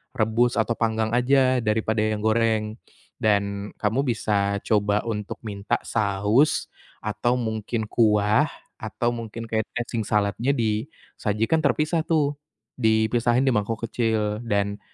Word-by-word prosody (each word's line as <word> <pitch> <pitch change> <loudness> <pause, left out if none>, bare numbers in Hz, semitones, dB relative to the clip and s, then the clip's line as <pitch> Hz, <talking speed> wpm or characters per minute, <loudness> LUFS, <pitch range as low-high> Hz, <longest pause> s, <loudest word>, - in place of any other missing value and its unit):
rebus 115 +2 +2
atau 115 +1 0
panggang 110 -1 0
aja 130 +1 +3
daripada 110 0 0
yang 105 -1 -2
goreng, 110 0 +1 0.4
dan 100 -1 0
kamu 120 +6 0
bisa 100 -2 0
coba 105 -1 +1
untuk 105 -3 -4
minta 100 -2 -2
saus, 105 +6 +1 0.3
atau 115 +4 0
mungkin 110 -1 -2
kuah 105 +4 +3 0.3
atau 110 +3 -2
mungkin 115 -1 -6
kayak 110 -1 -2
dressing 120 -3 -3
salad-nya 105 +6 +1
disajikan 115 +2 -1
terpisah 155 +2 +1
tuh, 145 -3 +1 0.4
dipisahin 115 +2 +2
di 135 - +3
mangkok 110 0 -1
kecil 110 -2 -1
dan, 100 -1 0
110 Hz, 120 wpm, -24 LUFS, 105-120 Hz, 0.4 s, aja